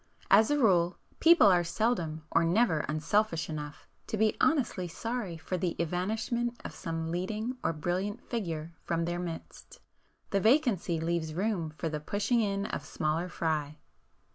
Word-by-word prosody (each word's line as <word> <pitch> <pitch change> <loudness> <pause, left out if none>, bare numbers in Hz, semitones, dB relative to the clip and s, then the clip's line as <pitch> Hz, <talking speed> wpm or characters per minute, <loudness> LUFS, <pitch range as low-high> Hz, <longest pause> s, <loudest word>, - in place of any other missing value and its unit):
As 220 - +7
a 295 - +2
rule, 180 -9 +3 0.2
people 330 -7 +7
are 180 -3 +5
seldom 170 -4 -1
or 165 - +4
never 170 -1 +3
unselfish 160 +2 0
enough 150 -1 -7 0.2
to 220 - -2
be 215 0 +3
honestly 235 - +2
sorry 215 0 -4
for 180 +3 -4
the 175 -1 -1
evanishment 220 +8 -1
of - - -5
some 165 -1 -4
leading 215 +8 -2
or - - +2
brilliant 180 +7 -2
figure 170 -8 -3
from 170 0 -1
their 175 +1 -2
midst,—the 175 +3 -7
vacancy 220 - +2
leaves 160 -1 -2
room 190 -4 -1
for 165 - -2
the 155 -1 -3
pushing 205 - 0
in 200 -1 -1
of - - -4
smaller 155 +5 -1
fry. 155 -3 -2
180 Hz, 150 wpm, -30 LUFS, 165-220 Hz, 0.2 s, As